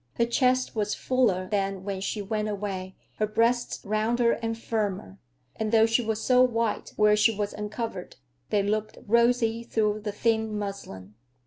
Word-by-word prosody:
Her 235 - +2
chest 255 +1 +1
was 210 -1 0
fuller 215 -8 +1
than 195 -1 -1
when 195 -1 -4
she 205 +1 -3
went 215 +1 -2
away, 195 -2 -4 0.2
her 215 - +1
breasts 235 +3 0
rounder 230 +3 +2
and 225 0 -2
firmer, 200 - -3 0.4
and 220 -1 -2
though 225 -1 +6
she 225 +2 +2
was 220 -1 -1
so 250 +2 +4
white 230 -3 0
where 210 0 +5
she 215 +2 +4
was 205 0 -2
uncovered, 210 -2 -5 0.3
they 205 -1 +2
looked 215 +1 -2
rosy 235 0 +2
through 215 -2 0
the 210 0 -4
thin 220 0 0
muslin. 105 - -6
215 Hz, 160 wpm, -27 LUFS, 205-230 Hz, 0.4 s, though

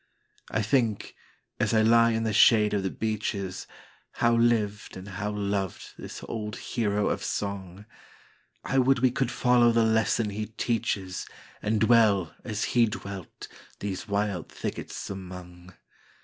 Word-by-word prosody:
I 110 - 0
think, 115 -2 0 0.5
as - - +1
I 110 - +5
lie 115 +1 +5
in 115 -1 0
the 110 -1 -1
shade 105 0 +5
of 100 - +1
the 95 - -1
beeches, 105 -3 -3 0.5
How 120 0 +2
lived 110 -4 +1
and 95 +2 -9
how 105 +1 -4
loved 100 -2 -3
this - - -9
old 105 -2 -4
hero 105 -3 -1
of - - -2
song;I 100 +6 -5
would 135 +1 +4
we 125 +1 +3
could 130 -1 0
follow 125 -2 +4
the 115 -1 +3
lesson 110 -1 +2
he 105 +1 -4
teaches, 110 -4 -2 0.3
And 105 +1 0
dwell, 110 -7 +4
as 110 -2 -3
he 120 -1 +5
dwelt, 100 -4 -7 0.3
these 100 -2 -4
wild 100 -4 -1
thickets - - -5
among. 90 -2 -9
105 Hz, 140 wpm, -27 LUFS, 100-115 Hz, 0.5 s, I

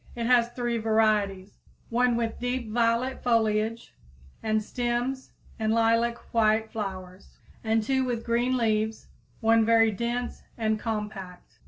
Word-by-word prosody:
It 235 -1 -3
has 240 -1 +4
three 240 -1 -2
varieties; 210 -3 +1 0.3
one 245 +1 +2
with 230 -1 -2
deep 245 -2 -3
violet 235 +3 +1
foliage 225 -1 0 0.5
and 215 -1 0
stems 245 +3 -2 0.3
and 220 0 0
lilac 230 +1 +2 0.2
white 220 -1 +2
flowers, 190 -3 -7 0.3
and 220 0 +1
two 265 +3 +1
with 240 -3 -3
green 245 +2 +1
leaves, 220 -1 -1 0.3
one 225 0 +4
very 225 0 +4
dense 240 +3 -3 0.2
and 220 -1 0
compact. 210 -5 -5
225 Hz, 130 wpm, -27 LUFS, 215-240 Hz, 0.5 s, has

